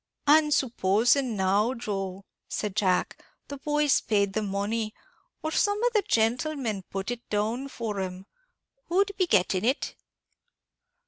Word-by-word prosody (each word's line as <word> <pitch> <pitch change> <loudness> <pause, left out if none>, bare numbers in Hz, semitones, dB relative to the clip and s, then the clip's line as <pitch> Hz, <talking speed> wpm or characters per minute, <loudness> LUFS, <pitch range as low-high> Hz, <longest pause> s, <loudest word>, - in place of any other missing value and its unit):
"And 300 +1 +5
supposing 240 0 +2
now, 200 +6 +2
Joe," 195 -4 -4 0.2
said 210 -2 -3
Jack, 190 -4 +1 0.3
"the 285 - -5
boys 295 0 +2
paid 200 -3 +1
the 215 - 0
money, 210 +2 -2 0.5
or 315 - -2
some 410 +4 +2
of 485 -1 +2
the 425 - +4
gentlemen 230 - 0
put 195 +4 -3
it 240 0 -7
down 220 +6 -1
for 225 -6 -4
'em; 185 0 -5 0.6
who'd 390 +3 +2
be 370 -2 +1
getting 185 - +2
it?" 255 +5 0
225 Hz, 135 wpm, -27 LUFS, 200-280 Hz, 0.6 s, And